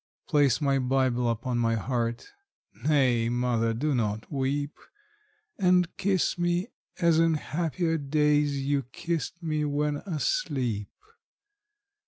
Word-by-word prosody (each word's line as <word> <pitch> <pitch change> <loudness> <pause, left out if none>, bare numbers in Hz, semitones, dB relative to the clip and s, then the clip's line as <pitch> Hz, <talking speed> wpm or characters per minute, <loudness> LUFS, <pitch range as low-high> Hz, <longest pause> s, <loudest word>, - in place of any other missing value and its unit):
Place 145 -4 +3
my 140 -2 +2
Bible 130 -2 +1
upon 120 +2 -1
my 115 -1 +2
heart 115 +1 -2 0.5
nay, 130 -6 +2
mother, 120 -2 +1
do 140 +7 -1
not 110 -3 -2
weep 140 +2 -1 0.9
And 180 -2 +3
kiss 190 -3 0
me 175 +4 0 0.3
as 170 -2 +4
in 165 -1 +3
happier 165 +1 -1
days 145 0 +2
you 140 0 +1
kissed 165 +6 -4
me 155 -2 -1
when 145 0 0
asleep. 145 - -2
145 Hz, 115 wpm, -27 LUFS, 125-160 Hz, 0.9 s, as